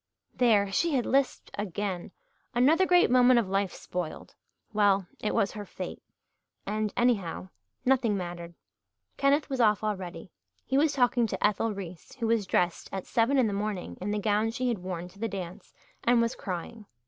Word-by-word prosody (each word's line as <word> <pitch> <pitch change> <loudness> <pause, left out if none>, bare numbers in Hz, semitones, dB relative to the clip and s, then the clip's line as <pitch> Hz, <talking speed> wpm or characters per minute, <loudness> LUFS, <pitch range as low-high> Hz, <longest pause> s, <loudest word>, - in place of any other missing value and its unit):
There! 210 -5 +3
She 320 +9 +1
had 245 - +1
lisped 270 0 0
again. 200 -1 -3 0.5
Another 315 +10 +4
great 355 -7 +5
moment 250 -1 +6
of 220 - -1
life 195 -1 0
spoiled! 175 -3 -6 0.4
Well, 200 -2 +3
it 215 - -1
was 200 - +2
her 210 -2 -6
fate. - - -7 0.6
And 215 +1 -1
anyhow, 200 -7 0 0.4
nothing 250 -5 +3
mattered. 175 -2 -6 0.6
Kenneth 280 +2 +3
was 265 -3 -1
off 215 -2 +3
already 190 -4 -4 0.3
he 265 - -1
was 295 +2 +3
talking 245 -3 +3
to - - -1
Ethel 210 +2 +1
Reese, 180 -3 -9
who 235 - -3
was 225 -3 +1
dressed, 175 0 0
at 190 -1 -4
seven 235 +4 +2
in 255 - +4
the 210 - -1
morning, 205 -2 -3
in 195 - -2
the 210 - 0
gown 210 +1 +1
she 250 +2 -1
had 230 -5 -1
worn 180 -1 -5
to 195 - -19
the 225 +1 -1
dance, 185 0 -7 0.3
and 240 0 +4
was 230 0 +1
crying. 195 +4 -6
210 Hz, 175 wpm, -28 LUFS, 190-245 Hz, 0.6 s, moment